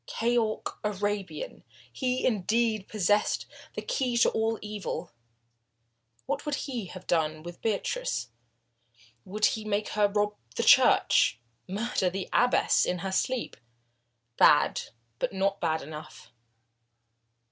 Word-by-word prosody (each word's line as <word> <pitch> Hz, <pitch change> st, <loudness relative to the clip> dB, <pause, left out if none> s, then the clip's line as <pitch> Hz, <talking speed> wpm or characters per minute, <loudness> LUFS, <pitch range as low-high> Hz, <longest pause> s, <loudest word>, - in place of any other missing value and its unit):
Keyork 230 Hz, -2 st, -1 dB
Arabian! 205 Hz, -5 st, -3 dB, 0.3 s
He, 255 Hz, -, -1 dB
indeed, 220 Hz, -1 st, +1 dB
possessed 210 Hz, 0 st, +1 dB, 0.3 s
the -, -, -4 dB
key 260 Hz, -, -1 dB
to 240 Hz, -, +4 dB
all 225 Hz, 0 st, 0 dB
evil. 210 Hz, -1 st, -5 dB, 1.1 s
What -, -, -2 dB
would 295 Hz, -1 st, -1 dB
he 240 Hz, -8 st, -4 dB
have 185 Hz, 0 st, -10 dB
done 155 Hz, -2 st, 0 dB
with 175 Hz, 0 st, -9 dB
Beatrice? -, -, -1 dB, 1.0 s
Would 210 Hz, +3 st, 0 dB
he 220 Hz, -, +1 dB
make 210 Hz, 0 st, -1 dB
her 210 Hz, -1 st, +3 dB
rob 210 Hz, 0 st, 0 dB, 0.2 s
the -, -, 0 dB
church 115 Hz, -, +5 dB, 0.3 s
murder 200 Hz, -1 st, 0 dB
the 190 Hz, +1 st, -4 dB
abbess 245 Hz, +1 st, +4 dB
in 180 Hz, -, 0 dB
her 190 Hz, -, -2 dB
sleep? 255 Hz, +6 st, -1 dB, 0.8 s
Bad, -, -, +5 dB, 0.4 s
but -, -, -1 dB
not 195 Hz, +1 st, 0 dB
bad 160 Hz, -1 st, 0 dB
enough. 155 Hz, +1 st, -10 dB
210 Hz, 120 wpm, -28 LUFS, 190-230 Hz, 1.1 s, church